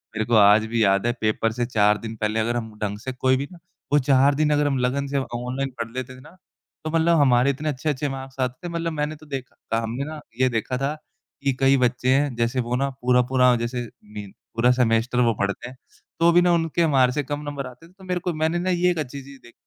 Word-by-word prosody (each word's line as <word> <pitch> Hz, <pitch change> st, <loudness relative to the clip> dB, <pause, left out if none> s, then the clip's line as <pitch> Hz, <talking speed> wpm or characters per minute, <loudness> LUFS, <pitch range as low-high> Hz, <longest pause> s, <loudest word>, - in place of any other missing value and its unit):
मेरे 110 Hz, 0 st, -1 dB
को 120 Hz, -, +1 dB
आज 105 Hz, +1 st, +6 dB
भी 115 Hz, 0 st, +1 dB
याद 100 Hz, +1 st, +2 dB
है -, -, +3 dB
पेपर 110 Hz, +1 st, +1 dB
से 120 Hz, +2 st, -2 dB
चार 105 Hz, -3 st, +3 dB
दिन 110 Hz, 0 st, -7 dB
पहले 110 Hz, 0 st, -1 dB
अगर 115 Hz, +2 st, 0 dB
हम 110 Hz, -2 st, -5 dB
ढंग 105 Hz, 0 st, -2 dB
से 130 Hz, +4 st, -5 dB
कोई 130 Hz, +1 st, +2 dB
भी 140 Hz, -, -4 dB
ना 180 Hz, -, -12 dB, 0.4 s
वो 145 Hz, -, +6 dB
चार 135 Hz, +1 st, +3 dB
दिन 150 Hz, +1 st, +2 dB
अगर 145 Hz, 0 st, +2 dB
हम 140 Hz, -2 st, 0 dB
लगन 130 Hz, +3 st, 0 dB
से 140 Hz, 0 st, -2 dB
अ, -, -, +1 dB
ऑनलाइन 125 Hz, +3 st, -3 dB
पढ़ 115 Hz, -, -5 dB
लेते 130 Hz, 0 st, -6 dB
ना, 170 Hz, +8 st, -16 dB, 0.5 s
तो 155 Hz, -, -3 dB
मतलब 165 Hz, +1 st, +3 dB
हमारे 130 Hz, -2 st, +4 dB
इतने 145 Hz, +3 st, -2 dB
अच्छे-अच्छे 145 Hz, 0 st, -2 dB
मार्क्स 135 Hz, 0 st, -8 dB
आते 130 Hz, +6 st, -3 dB
थे, -, -, -5 dB
मतलब 165 Hz, 0 st, -2 dB
मैंने 150 Hz, 0 st, -2 dB
तो 155 Hz, +1 st, -16 dB
देखा 135 Hz, -3 st, -7 dB, 0.2 s
था 115 Hz, -, +2 dB
हमने 115 Hz, +4 st, -3 dB
ना 155 Hz, -1 st, -7 dB, 0.2 s
ये 130 Hz, -, +4 dB
देखा 120 Hz, +2 st, -2 dB
था 135 Hz, +3 st, -1 dB, 0.5 s
कि 140 Hz, -1 st, +2 dB
कई 135 Hz, 0 st, +4 dB
बच्चे 125 Hz, 0 st, +1 dB
हैं, 140 Hz, -2 st, 0 dB
जैसे 115 Hz, +2 st, 0 dB
वो 120 Hz, 0 st, -1 dB
ना 135 Hz, +2 st, 0 dB
पूरा-पूरा 125 Hz, 0 st, +3 dB
जैसे 120 Hz, +1 st, -3 dB, 0.2 s
मी 105 Hz, -1 st, -8 dB, 0.3 s
पूरा 120 Hz, +2 st, +4 dB
सेमेस्टर 120 Hz, 0 st, +1 dB
वो 115 Hz, -1 st, +3 dB
पढ़ते 100 Hz, +4 st, -2 dB
हैं, 130 Hz, -, -14 dB, 0.4 s
तो 170 Hz, +1 st, +5 dB
भी 175 Hz, -, +5 dB
ना 175 Hz, 0 st, +3 dB
उनके 165 Hz, 0 st, 0 dB
हमारे 135 Hz, -6 st, +3 dB
से 145 Hz, +3 st, -2 dB
कम 145 Hz, +2 st, -4 dB
नंबर 140 Hz, -2 st, -5 dB
आते 125 Hz, +6 st, -14 dB
थे, -, -, -22 dB
तो 190 Hz, 0 st, -18 dB
मेरे 180 Hz, -1 st, -2 dB
को 180 Hz, 0 st, -3 dB
मैंने 160 Hz, +2 st, 0 dB
ना 180 Hz, +2 st, -1 dB
ये 180 Hz, 0 st, +2 dB
एक 170 Hz, -, -3 dB
अच्छी 140 Hz, -1 st, -5 dB
चीज़ 140 Hz, 0 st, -13 dB
देख 120 Hz, -, -16 dB
130 Hz, 255 wpm, -23 LUFS, 120-145 Hz, 0.5 s, आज